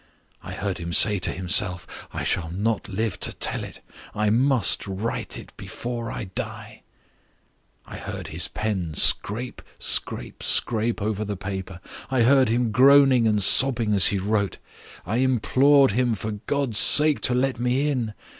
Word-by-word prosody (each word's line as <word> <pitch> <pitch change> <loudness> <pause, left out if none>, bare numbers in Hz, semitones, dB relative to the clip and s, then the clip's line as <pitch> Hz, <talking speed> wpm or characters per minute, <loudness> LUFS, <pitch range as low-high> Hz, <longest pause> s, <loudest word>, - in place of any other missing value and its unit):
I - - -9
heard 100 -3 -4
him 85 0 -6
say 105 +1 +5
to - - +2
himself: 90 0 -2
I - - -5
shall 80 -2 -1
not 105 +4 -2
live 105 0 -3
to - - -3
tell - - -2
it: - - -10 0.3
I 105 0 0
must 125 -4 +2
write 100 +4 -4
it - - -12
before 120 -1 -6
I - - -5
die. 95 -2 -8 1.0
I - - -10
heard - - -7
his 85 +3 -1
pen 95 -6 -4
scrape, 120 +10 +1 0.2
scrape, - - -3
scrape 115 -1 0
over 105 0 -2
the 105 -2 -5
paper; 95 -1 -7 0.3
I 130 -2 +1
heard 130 0 +4
him 120 0 0
groaning 130 0 +5
and 105 -2 +1
sobbing 120 -2 +3
as 100 -2 +8
he 100 - +1
wrote; 100 +1 -1 0.5
I 105 +7 -2
implored 130 +2 +3
him 120 +1 0
for 105 +2 -5 0.2
God's 135 -6 -1
sake 150 0 +4
to 125 - +1
let 130 -1 -1
me 125 +4 0
in. 120 -7 -2
110 Hz, 160 wpm, -23 LUFS, 100-125 Hz, 1.0 s, as